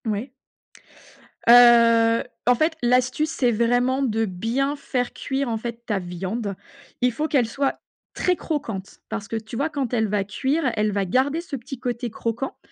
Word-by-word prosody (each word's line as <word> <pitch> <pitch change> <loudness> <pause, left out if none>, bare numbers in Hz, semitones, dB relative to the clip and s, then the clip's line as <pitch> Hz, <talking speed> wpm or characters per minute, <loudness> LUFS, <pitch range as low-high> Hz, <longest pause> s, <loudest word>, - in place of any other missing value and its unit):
Ouais. 220 +4 -2 1.2
Heu, 230 -1 +7 0.2
en 245 - +5
fait, 315 +5 +1
l'astuce, 250 +5 +2
c'est 250 -5 +1
vraiment 245 +4 +1
de 225 -3 +1
bien 230 +9 -1
faire 250 -3 -2
cuire 270 -1 -2
en 225 - -1
fait 235 +1 -6
ta 210 - -1
viande. 190 +4 -4 0.5
Il 250 0 +3
faut 300 +7 -2
qu'elle 260 -7 +2
soit 275 +4 -1 0.3
très 365 - +1
croquante. 225 - -5
Parce 215 -2 -4
que 225 - -2
tu 220 +1 -8
vois 285 +7 0
quand 275 -5 -3
elle 220 -2 +2
va 205 -1 0
cuire, 265 +8 0
elle 210 0 +1
va 200 -1 0
garder 265 - +1
ce 330 -4 -6
petit 255 +1 -8
côté 245 -1 -3
croquant 230 +4 -4
240 Hz, 170 wpm, -23 LUFS, 220-270 Hz, 1.2 s, Heu